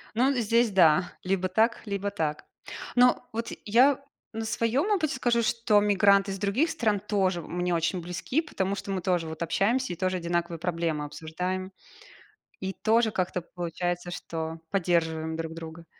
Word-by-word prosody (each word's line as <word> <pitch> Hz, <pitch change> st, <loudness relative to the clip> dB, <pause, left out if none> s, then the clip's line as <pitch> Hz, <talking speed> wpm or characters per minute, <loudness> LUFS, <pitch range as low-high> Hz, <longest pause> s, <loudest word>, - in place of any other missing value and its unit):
Ну, 255 Hz, +4 st, +3 dB
здесь 235 Hz, -2 st, +2 dB
да, 180 Hz, -2 st, +4 dB
либо 185 Hz, 0 st, 0 dB
так, 220 Hz, +5 st, +2 dB
либо 200 Hz, -1 st, -2 dB
так. 160 Hz, -7 st, -3 dB, 0.5 s
Но 250 Hz, 0 st, +4 dB
вот 230 Hz, +1 st, -3 dB, 0.2 s
я 255 Hz, +6 st, +4 dB, 0.3 s
на 225 Hz, 0 st, -4 dB
своём 230 Hz, -, 0 dB
опыте 320 Hz, -9 st, +1 dB
скажу, 235 Hz, -2 st, +2 dB
что 230 Hz, -2 st, +3 dB
мигранты 200 Hz, -1 st, +4 dB
из 195 Hz, -, -5 dB
других 205 Hz, -, +1 dB
стран 215 Hz, -8 st, 0 dB
тоже 190 Hz, -4 st, 0 dB
мне 175 Hz, +2 st, -2 dB
очень 165 Hz, +3 st, 0 dB
близки, 180 Hz, -, -2 dB
потому 195 Hz, -, -2 dB
что 200 Hz, -, -6 dB
мы 190 Hz, -1 st, -1 dB
тоже 175 Hz, -3 st, 0 dB
вот 160 Hz, 0 st, -7 dB
общаемся 230 Hz, +9 st, +1 dB
и -, -, -3 dB
тоже 185 Hz, 0 st, 0 dB
одинаковые 170 Hz, 0 st, -2 dB
проблемы 165 Hz, -3 st, -1 dB
обсуждаем. 180 Hz, +5 st, -4 dB, 0.9 s
И 190 Hz, 0 st, -2 dB
тоже 225 Hz, +3 st, +2 dB
как-то 185 Hz, -2 st, -1 dB
получается, 175 Hz, +1 st, -4 dB
что 165 Hz, -2 st, -5 dB
поддерживаем 160 Hz, -4 st, 0 dB
друг 160 Hz, 0 st, -4 dB
друга. 165 Hz, 0 st, -9 dB
190 Hz, 160 wpm, -27 LUFS, 170-220 Hz, 0.9 s, да